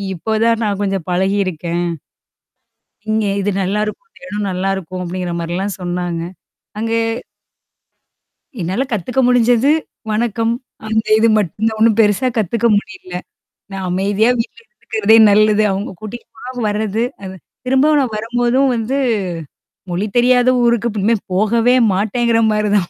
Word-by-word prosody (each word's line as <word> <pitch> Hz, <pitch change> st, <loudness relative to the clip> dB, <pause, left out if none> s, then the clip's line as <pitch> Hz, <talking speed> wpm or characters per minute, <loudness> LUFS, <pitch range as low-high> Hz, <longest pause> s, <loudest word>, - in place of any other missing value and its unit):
இப்ப 220 Hz, +6 st, -2 dB
தான் 230 Hz, 0 st, +2 dB
நான் 205 Hz, -2 st, -1 dB
கொஞ்சம் 195 Hz, -4 st, -1 dB
பழகியிருக்கேன். 180 Hz, -2 st, -1 dB, 1.3 s
இங்க 215 Hz, -1 st, +1 dB
இது 205 Hz, -, 0 dB
நல்லாயிருக்கும். 210 Hz, -, -2 dB, 0.2 s
இடம் 205 Hz, -6 st, -3 dB
நல்லாயிருக்கும். 185 Hz, -1 st, -3 dB
அப்படிங்கிற 180 Hz, 0 st, -4 dB
மாரிலாம் 180 Hz, +4 st, -3 dB
சொன்னாங்க. 175 Hz, -1 st, -3 dB, 0.6 s
அங்கே. 230 Hz, +1 st, 0 dB, 1.6 s
என்னால 185 Hz, +9 st, -1 dB
கத்துக்க 235 Hz, +5 st, -1 dB
முடிஞ்சது, 245 Hz, +2 st, +4 dB, 0.4 s
வணக்கம். 230 Hz, +1 st, 0 dB, 0.3 s
அந்த 220 Hz, 0 st, 0 dB
இது 230 Hz, -, +4 dB
மட்டும் 210 Hz, +3 st, 0 dB
ஒன்னும் 225 Hz, -1 st, +4 dB
பெருசா 215 Hz, +4 st, +3 dB
கத்துக்க 225 Hz, +3 st, +1 dB
முடியல. 195 Hz, -3 st, -7 dB, 0.6 s
நான் 190 Hz, -1 st, -4 dB
அமைதியா 200 Hz, +5 st, +2 dB
வீட்ல. 230 Hz, -, -6 dB, 0.2 s
இருக்கறதே 220 Hz, 0 st, +3 dB
நல்லது. 215 Hz, +1 st, +4 dB
அவங்க 195 Hz, +2 st, -3 dB
கூட்டிட்டு 220 Hz, +2 st, -8 dB
போ 250 Hz, +1 st, -6 dB
வரது. 215 Hz, +2 st, -1 dB, 0.2 s
அது 190 Hz, 0 st, -7 dB, 0.3 s
திரும்ப 265 Hz, +4 st, +3 dB
நான் 250 Hz, -5 st, -1 dB
வரும்போதும் 245 Hz, +4 st, +1 dB
வந்து 235 Hz, +3 st, -2 dB, 1.0 s
மொழி 185 Hz, +5 st, -1 dB
தெரியாத 250 Hz, +1 st, +4 dB
ஊருக்கு 235 Hz, -1 st, +2 dB
இனிமே 225 Hz, +4 st, +2 dB, 0.2 s
போகவே 225 Hz, +5 st, +3 dB, 0.2 s
மாட்டேங்கிற 225 Hz, +4 st, +1 dB
மாரி 210 Hz, 0 st, 0 dB
தான். 180 Hz, -3 st, -1 dB
215 Hz, 125 wpm, -17 LUFS, 195-235 Hz, 1.6 s, முடிஞ்சது